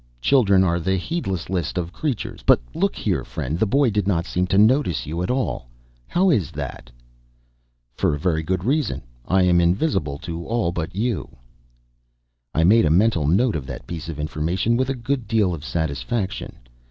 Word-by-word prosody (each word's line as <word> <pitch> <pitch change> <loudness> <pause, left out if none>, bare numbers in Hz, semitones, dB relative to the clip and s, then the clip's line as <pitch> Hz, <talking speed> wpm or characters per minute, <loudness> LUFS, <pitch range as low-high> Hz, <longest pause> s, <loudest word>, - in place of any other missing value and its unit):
Children 100 - +4
are 85 -2 +1
the 95 +3 0
heedlessest 95 - -3 0.2
creatures. 140 -8 -3
But - - +5
look - - 0
here, - - -1
friend, 75 +7 -4
the 110 - +2
boy 135 +3 +3
did 105 -1 0
not 85 -4 +1
seem 90 0 -1
to 95 - +1
notice 110 - +3
you 80 +3 -3
at 90 - -2
all; 125 - -1 0.4
how 185 +1 +3
is 105 - +1
that?" 70 -6 -7 1.0
"For 70 - +1
a - - -6
very 80 -1 +1
good 90 +2 -2
reason. 145 +6 0 0.2
I 95 0 +3
am 90 -1 +4
invisible 85 - +1
to 85 +2 -6
all 115 -6 0
but 85 -1 -4
you." 115 +1 -2 1.2
I 80 - +1
made 105 +4 +5
a - - +3
mental 85 -3 +3
note 105 +9 +3
of 70 -4 -4
that 65 -2 -7
piece 85 +2 -6
of 75 -2 -6
information 80 +9 0
with 130 +2 0
a 135 - 0
good 125 -1 -2
deal 105 -4 +2
of 75 -4 -6
satisfaction. 85 - -3
95 Hz, 180 wpm, -22 LUFS, 80-115 Hz, 1.2 s, But